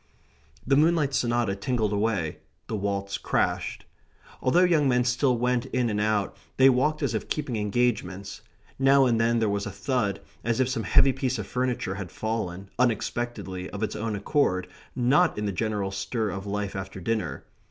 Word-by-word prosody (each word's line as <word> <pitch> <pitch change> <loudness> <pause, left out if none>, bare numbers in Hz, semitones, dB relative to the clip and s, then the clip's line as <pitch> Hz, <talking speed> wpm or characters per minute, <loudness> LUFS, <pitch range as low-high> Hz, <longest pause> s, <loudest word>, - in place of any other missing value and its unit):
The 135 - +3
Moonlight 155 -1 +3
Sonata 120 -5 +1
tinkled 110 0 -1
away; 100 -7 -1 0.3
the 110 - -4
waltz 100 -1 -2
crashed. - - -1 0.6
Although 170 +8 +4
young 160 -6 +3
men 125 -1 +3
still 120 +1 +2
went 125 +1 0
in 125 -3 0
and 105 0 0
out, 105 -1 0 0.2
they 135 0 +7
walked 150 +5 +1
as 130 -5 0
if 110 - -3
keeping 140 -6 -2
engagements. 105 -3 -1 0.4
Now 135 0 +5
and 115 -2 +2
then 115 +1 +2
there 115 -1 +2
was 100 0 -1
a - - -4
thud, 105 +1 -1 0.2
as 115 0 0
if 130 - +3
some 115 -4 -2
heavy 130 +10 +5
piece 130 -1 -1
of 105 - -4
furniture 125 -5 -1
had 95 -3 -6
fallen, 100 -4 -4
unexpectedly, 110 -5 -1
of 100 +1 -5
its 110 - -2
own 110 0 -2
accord, 100 -4 +1 0.3
not 135 +8 +3
in 105 - -2
the 100 - 0
general 105 0 -2
stir 100 +2 -2
of 95 +2 -6
life 100 0 -3
after 95 0 -6
dinner. 110 +4 -2
115 Hz, 175 wpm, -26 LUFS, 100-125 Hz, 0.6 s, they